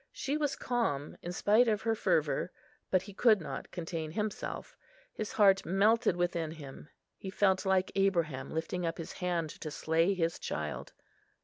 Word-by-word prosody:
She 275 +2 -2
was 295 -3 0
calm, 190 - -1
in 175 - -5
spite 215 +6 +4
of 215 -1 +1
her 225 0 +2
fervour; 220 - +1 0.4
but 185 -1 +2
he 200 - -10
could 220 0 +5
not 165 - -6
contain 165 -2 -4
himself. 210 +5 -4 0.4
His 215 - -4
heart 195 -2 +5
melted 210 +3 +3
within 175 -2 -1
him; 150 -2 -10 0.3
he 190 - -7
felt 190 0 +2
like 190 0 +2
Abraham, 170 -9 +1
lifting 165 +3 -3
up 165 0 -2
his 165 - -6
hand 170 -3 -2
to 155 - -4
slay 165 +5 +1
his 165 -2 0
child. 75 -3 -4
185 Hz, 165 wpm, -32 LUFS, 165-210 Hz, 0.4 s, could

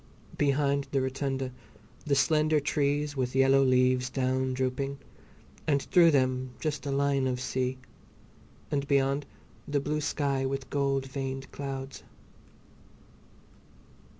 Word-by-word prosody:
Behind 140 -1 +1
the 140 - +2
rotunda 135 0 -2 0.6
the 140 - +3
slender 155 +2 +3
trees 145 0 0
with 130 -1 -2
yellow 135 +1 +5
leaves 130 -1 +3
down 130 0 0
drooping, 130 +2 -2 0.7
and 140 -3 +2
through 175 -2 +5
them 130 -3 +1
just 150 -2 -3
a - - -1
line 140 -1 +1
of 125 -1 -1
sea, 130 0 -2 0.9
and 140 -1 -1
beyond 140 0 +1 0.4
the 145 0 +1
blue 150 +2 -2
sky 140 -2 0
with 135 -1 -3
gold 140 -1 0
veined 135 0 -5
clouds. 135 -1 -6
135 Hz, 120 wpm, -29 LUFS, 130-140 Hz, 0.9 s, yellow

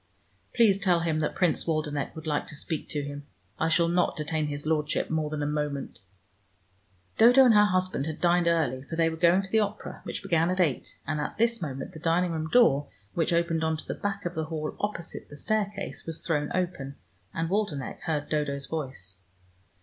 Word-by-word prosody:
"Please 215 -5 +5
tell 180 -3 +3
him 160 -2 0
that 150 - -1
Prince 180 -3 +1
Waldenech 155 -3 -1
would 160 0 -8
like 150 -2 -1
to - - -9
speak 155 +1 -4
to 145 -1 -2
him. 145 0 -7 0.3
I 160 - +2
shall 170 +1 +4
not 175 +1 +2
detain 155 0 -1
his 145 0 -5
Lordship 155 -1 0
more 155 -1 0
than 150 -1 -3
a - - 0
moment!" 150 -2 -3 1.2
Dodo 245 +4 +8
and 240 - +6
her 210 0 +7
husband 185 -6 0
had 155 - -4
dined 175 0 +3
early, 160 -6 +1
for 145 +5 -7
they 165 0 +3
were 160 - -4
going 175 +3 +4
to 190 - -8
the 220 - +4
opera 210 -1 -3
which - - -5
began 170 -3 +2
at 185 +1 -1
eight, 155 -8 0
and 150 -1 -1
at - - -4
this 230 +1 +2
moment 135 -2 -5
the 160 - -9
dining 170 +2 +1
room 160 -1 -3
door, 145 - +5 0.3
which 165 -1 +1
opened 170 -1 +1
on 160 0 +1
to - - -7
the - - -2
back 200 -1 -4
of 175 - -2
the 160 -2 -2
hall 155 -1 -4
opposite 205 -5 -4
the 145 - -10
staircase, 205 +1 -2
was 165 -1 -5
thrown 150 -3 0
open, 170 -7 -2 0.4
and 165 0 -2
Waldenech 195 -10 -1
heard 155 -3 -2
Dodo's 140 -2 -1
voice. 130 - -5
160 Hz, 205 wpm, -28 LUFS, 150-180 Hz, 1.2 s, Dodo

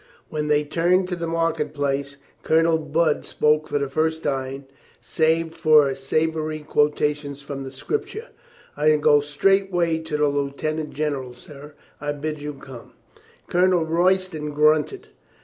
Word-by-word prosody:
When 150 -1 -3
they 150 0 +3
turned 175 +5 +1
to 180 - -2
the 170 -1 -4
market 165 -1 -1
place 140 0 -2 0.2
Colonel 165 0 +3
Budd 155 +1 0
spoke 150 0 +1
for - - -1
the 140 -1 -1
first 160 +3 -1
time, 135 -1 -3 0.3
save 160 0 0
for 150 -4 +4
sav 155 +4 -1
ory 155 0 -3
quotations 150 -1 0
from 140 -1 -6
the 135 - -7
Scripture, 425 - -4 0.5
"I 155 +1 +3
go 150 -1 +4
straight 195 +7 +1
way 170 -2 +1
to 160 -2 -4
the 150 0 +2
lieutenant 145 +2 -2
general, 140 -4 -3
sir. 145 +3 -13 0.2
I 145 0 -3
bid 150 +1 -5
you 150 0 -5
come." 135 -3 -12 0.5
Colonel 180 -1 +2
Royston 170 -2 0
grunted. 155 - +2
150 Hz, 150 wpm, -23 LUFS, 145-165 Hz, 0.5 s, for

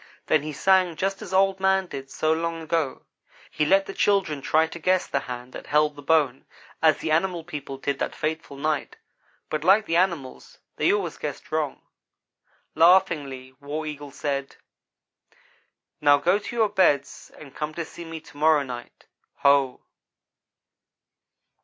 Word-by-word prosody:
Then 155 - +3
he 155 +1 -5
sang 185 +2 +3
just 195 +3 -2
as - - -8
Old 190 0 +3
man 190 0 +2
did 135 -5 -8
so 155 +3 +1
long 165 0 -3
ago. 160 -3 -2 0.5
He 150 - 0
let 195 +2 +4
the 195 - -7
children 190 -10 +1
try 160 +3 +3
to 165 +1 -9
guess 185 +2 +2
the - - -1
hand 125 +1 -7
that - - -9
held 150 0 +2
the 145 - -10
bone, 145 -4 +1 0.3
as 160 -2 +5
the 160 - -3
animal 170 +1 +1
people 145 -4 -7
did 140 +1 -2
that - - -2
fateful 155 -3 -4
night; 155 +1 -2 0.5
but, 155 -1 -3
like 200 +5 +5
the 165 - +1
animals, 170 -8 -2 0.2
they - - +3
always - - -2
guessed - - -6
wrong. - - -2 0.9
Laughingly 150 -7 +3
War 150 +2 -5
Eagle 145 -1 -6
said: 140 0 -4 1.5
"Now 145 -1 +6
go 180 +8 +2
to 210 - -7
your 220 -3 +3
beds 145 -8 +1
and 140 -3 -12
come 155 0 -4
to 170 - -3
see 170 - -10
me 165 -1 -7
to 145 - -16
morrow 155 -1 +4
night. 125 -2 -9 0.4
Ho!" 140 -2 +3
155 Hz, 160 wpm, -25 LUFS, 140-180 Hz, 1.5 s, Now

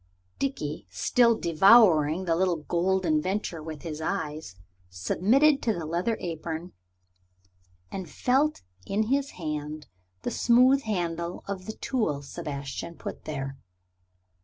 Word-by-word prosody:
Dickie, 150 - -3
still 230 - +3
devouring 175 -2 +5
the 165 -2 +2
little 180 0 +2
Golden 170 0 +1
Venture 185 -2 -2
with 155 -1 -8
his 160 -2 -5
eyes, 155 - -3 0.3
submitted 230 - +3
to 225 - +1
the 170 -5 -5
leather 175 +8 -1
apron, 165 0 -5 1.2
and 185 -4 -5
felt 275 - +1 0.2
in 210 +2 +1
his 280 0 +1
hand 150 -2 -4 0.4
the - - -2
smooth 255 +3 +4
handle 175 -6 -3
of 195 -2 -5
the 220 - -4
tool 160 - -1
Sebastian 145 +1 -6
put - - -8
there. 135 -3 -5
170 Hz, 120 wpm, -27 LUFS, 155-215 Hz, 1.2 s, devouring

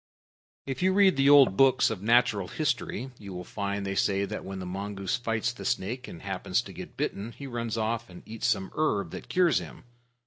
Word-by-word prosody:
If 135 +3 -4
you 185 +1 +3
read 195 -2 +5
the 135 +1 +4
old 140 -8 +7
books 135 -2 +4
of 105 -4 -4
natural 110 -3 +3
history, 130 - -2
you 100 -2 -8
will 90 0 -6
find 100 +1 -3
they 95 - -2
say 100 0 +1
that 105 +2 -5
when 95 0 -6
the 95 - -5
mongoose 100 +4 -3
fights 115 0 -1
the - - -9
snake 125 +1 -2
and 85 - -10
happens - - -1
to - - -10
get - - -9
bitten, 105 +4 -3
he 140 - -9
runs 115 -3 -3
off 115 +1 -1
and 90 - -12
eats 110 0 -3
some 95 -2 0
herb 100 - 0
that - - -8
cures 180 -2 +3
him. - - -10
115 Hz, 210 wpm, -28 LUFS, 100-130 Hz, -, old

